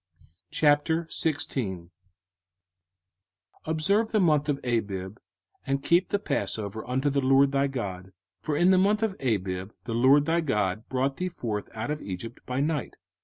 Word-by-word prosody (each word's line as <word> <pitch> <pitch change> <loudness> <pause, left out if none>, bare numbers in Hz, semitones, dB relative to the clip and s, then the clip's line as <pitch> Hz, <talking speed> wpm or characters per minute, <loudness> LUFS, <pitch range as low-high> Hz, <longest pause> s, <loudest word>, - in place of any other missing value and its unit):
05:016:001 145 - 0 1.7
Observe 195 +8 +1
the 215 - +2
month 150 -5 +3
of 145 - +1
Abib, 105 -4 -2 0.5
and 135 0 0
keep 175 +2 +3
the 205 - +1
passover 110 - -2
unto 130 +3 +1
the 140 0 +1
LORD 135 +1 +4
thy 140 0 +2
God: 95 -8 -5 0.3
for 150 -2 -1
in 180 +4 +5
the 185 - +5
month 210 +3 +2
of 220 -3 +1
Abib 95 -6 -1
the 115 - -4
LORD 135 +5 +5
thy 165 +2 +2
God 105 - -1
brought 135 +1 0
thee 185 0 -2
forth 110 - -4
out 115 +6 -3
of 150 - -3
Egypt 100 +5 -7
by 125 0 -2
night. 150 -1 -1
135 Hz, 150 wpm, -27 LUFS, 110-160 Hz, 1.7 s, in